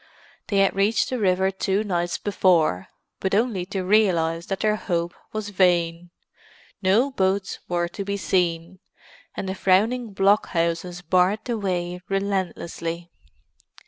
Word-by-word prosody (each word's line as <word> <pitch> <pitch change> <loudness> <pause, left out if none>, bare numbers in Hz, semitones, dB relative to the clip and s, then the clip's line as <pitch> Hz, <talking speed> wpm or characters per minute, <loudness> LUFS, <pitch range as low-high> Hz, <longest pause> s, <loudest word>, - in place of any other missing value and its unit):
They 200 - 0
had 195 0 +3
reached 205 +6 +1
the 255 - -1
river 190 -1 +2
two 195 +2 0
nights 175 -4 -1
before, 170 - +2 0.3
but 190 0 0
only 210 -5 0
to 190 -1 -3
realize 175 -5 +2
that 195 - -3
their 215 -1 +2
hope 175 -4 -2 0.2
was 215 -1 -4
vain; 175 -3 +1 0.7
no 215 +9 +3
boats 190 -3 -1
were 175 -1 0
to 200 - -5
be 200 +1 -3
seen, 175 -2 -1 0.6
and 195 - -3
the 190 - -2
frowning 215 +5 +1
blockhouses 180 -3 +1
barred 185 +4 +2
the 240 - -1
way 180 -4 -2
relentlessly. 175 -3 -3
190 Hz, 135 wpm, -24 LUFS, 175-200 Hz, 0.7 s, had